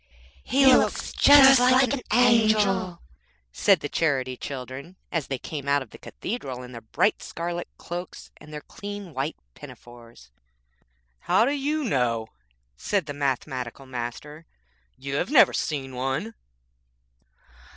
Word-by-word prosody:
'He 270 +2 +2
looks 265 - +3
just 270 -2 +7
like 255 +1 +4
an 275 - -3
angel,' 215 -6 +2 0.5
said 190 - +3
the - - -3
Charity 135 -5 -1
Children 135 +6 -8 0.2
as 165 -5 -2
they 135 - -3
came 140 +1 -7
out 140 -1 +2
of - - -20
the - - -13
cathedral 135 - -6
in 125 - -11
their 115 -2 -9
bright 110 - 0
scarlet 170 +1 -5
cloaks, 175 +1 -8
and 150 - -15
their 150 0 -7
clean 205 -2 -9
white 140 +4 -3 0.2
pinafores. 115 - -14 0.9
'How 225 - +2
do 275 - 0
you 295 +2 -1
know?' 120 - -1 0.5
said 190 - -2
the 145 - -6
Mathematical 135 -2 -3
Master, 130 +5 -7 0.5
'you 140 +1 -4
have - - -2
never 285 -3 +6
seen 135 -4 -3
one.' 135 - -3
150 Hz, 135 wpm, -25 LUFS, 130-215 Hz, 0.9 s, just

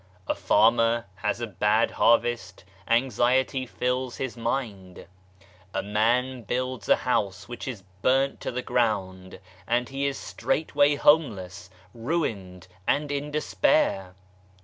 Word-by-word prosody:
A - - +1
farmer 115 +1 +3
has 105 +3 -2
a - - 0
bad 105 +2 +1
harvest, 120 -6 +1 0.2
anxiety 130 +2 +1
fills 125 +1 -2
his 130 -3 -4
mind. 110 -7 -4 0.7
A 95 - -1
man 120 +5 +1
builds 125 0 -3
a - - +7
house 100 -7 -1
which 120 +2 -7
is 115 -7 -6 0.2
burnt 135 +3 +2
to - - -3
the 125 +1 -4
ground 95 -7 -1 0.3
and 120 +1 0
he 135 +1 -1
is 140 - -3
straightway 145 0 +1
homeless, 105 - +1 0.2
ruined, 110 - -3 0.2
and 145 0 +1
in 145 +1 -3
despair. 150 - +1
120 Hz, 125 wpm, -26 LUFS, 105-130 Hz, 0.7 s, a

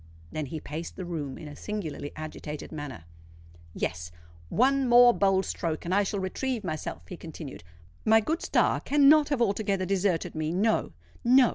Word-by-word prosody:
Then 155 -2 -3
he 155 +4 -5
paced 155 +3 -6
the 185 - -5
room 150 -6 -4
in 155 - -9
a 145 - -9
singularly 160 -9 -5
agitated 155 -1 -7
manner. 145 - -7 0.7
"Yes—one 80 - -1
more 240 0 +8
bold 195 -2 +2
stroke, 165 -2 -3
and 175 - -1
I 200 - +4
shall 200 0 -1
retrieve 225 +5 -2
myself," 155 -4 -5
he 180 - -7
continued. 160 - -9 0.4
"My 220 +1 +6
good 315 +10 -1
star - - +2
cannot 295 +1 +5
have 275 -5 +2
altogether 200 -3 0
deserted 190 -2 0
me. 155 0 -2
No—no! 220 - +2
180 Hz, 155 wpm, -28 LUFS, 150-220 Hz, 0.7 s, more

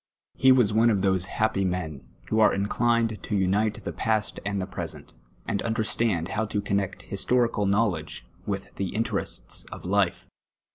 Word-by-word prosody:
He 130 - +5
wa.s 125 -5 +5
one 115 +2 +5
of 100 -4 +1
those 95 -2 +2
happy 110 0 0
men, 90 -6 -2 0.3
who 110 - +2
arc 110 - +5
ineliued 115 +2 +1
to 105 - -2
unite 100 +3 +1
the - - -4
pa.st 110 -3 0
and 100 0 -1
the 95 - -1
present, 95 - -6 0.3
and 100 - -1
understand 110 -5 0
how 110 +2 -1
to 105 - -1
connect 100 -1 -1
historical 115 +1 +1
knowledj^c 100 - 0 0.2
with 100 -1 -4
the 100 -1 -3
interests 110 - -2
of - - -8
life. - - +1
100 Hz, 160 wpm, -26 LUFS, 95-110 Hz, 0.3 s, He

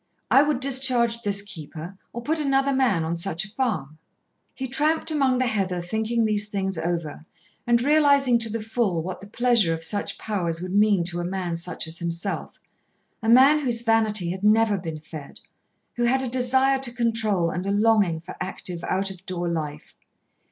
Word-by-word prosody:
I 270 - +7
would 290 -3 +1
discharge 255 -3 +2
this 200 -2 0
keeper 170 -2 -8 0.2
or 235 - -7
put 315 +5 0
another 275 -1 +2
man 245 -11 +2
on 165 +1 -2
such 175 +2 -3
a - - -11
farm." 185 - -3 0.6
He 265 - -4
tramped 305 +5 +1
among 270 -4 +2
the 255 - +1
heather 195 -6 -1
thinking 220 +6 -1
these 210 -1 0
things 195 -2 -2
over, 165 -2 -3 0.4
and 235 0 +4
realising 280 -4 +4
to 225 -1 -2
the 220 0 -4
full 215 -7 -1
what 185 +1 -6
the 200 - -10
pleasure 230 -6 +2
of 165 - -9
such 205 +5 -3
powers 175 -6 -2
would 185 +1 -5
mean 205 -3 +4
to 175 0 -3
a - - -2
man 180 -1 -3
such 170 0 -4
as 160 +1 -6
himself, 170 +3 -4 0.6
a 225 - -1
man 270 +6 +7
whose 240 -5 -1
vanity 215 -6 +1
had 190 +2 -6
never 215 -1 +4
been 165 -3 -6
fed, 155 -2 -10 0.6
who 240 - +1
had 265 +2 +2
a - - -2
desire 260 +2 +2
to 265 -2 -3
control 220 -7 0
and 180 +3 -4
a - - +1
longing 205 -6 +2
for 170 - -9
active 180 -2 -5
out 195 +1 -1
of 185 -1 -12
door 175 -1 -2
life. 155 -3 -4
210 Hz, 185 wpm, -24 LUFS, 175-245 Hz, 0.6 s, I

